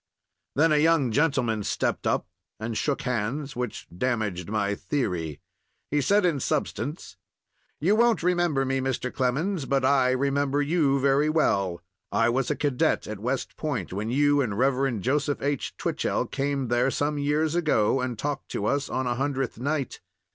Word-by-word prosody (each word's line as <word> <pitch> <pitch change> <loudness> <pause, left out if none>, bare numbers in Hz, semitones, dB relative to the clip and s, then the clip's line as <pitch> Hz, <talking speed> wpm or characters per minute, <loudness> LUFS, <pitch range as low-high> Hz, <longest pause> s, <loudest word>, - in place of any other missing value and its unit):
Then 160 +3 +4
a 150 - +4
young 150 -5 +3
gentleman 125 -5 +1
stepped - - -1
up - - +1 0.3
and 110 +1 -4
shook 140 +4 -1
hands, 125 +4 -2
which 125 0 -4
damaged 105 -5 -1
my 100 -1 0
theory. 90 - -2 0.5
He 145 0 +2
said, 200 +7 +3
in 165 -6 +1
substance: 120 - -3 0.6
"You 185 +8 +3
won't 235 -4 +3
remember 175 -6 +2
me, 135 0 0
Mr. 130 -1 -2
Clemens, 140 +6 0
but 135 -1 +1
I 130 -2 +4
remember 140 +2 +1
you 145 -2 +2
very 140 +2 +3
well. 100 - +1 0.3
I 115 +1 +3
was 125 +2 0
a 150 - +1
cadet 140 -4 +1
at 105 -2 -6
West 125 +5 -2
Point 125 - -3
when 105 +3 -3
you 145 +3 +3
and 110 -6 -2
Rev. 130 -3 +1
Joseph 140 +4 0
H. 140 -1 -2
Twichell - - -1
came 140 -2 -2
there 120 +2 +2
some 145 +2 -1
years 150 +2 +1
ago 135 -8 +2
and 125 -3 -3
talked 145 +4 -3
to 100 - -2
us 140 +5 0
on 130 - -1
a 120 - +1
Hundredth 135 -2 -2
Night. 140 0 -2
135 Hz, 165 wpm, -26 LUFS, 120-145 Hz, 0.6 s, Then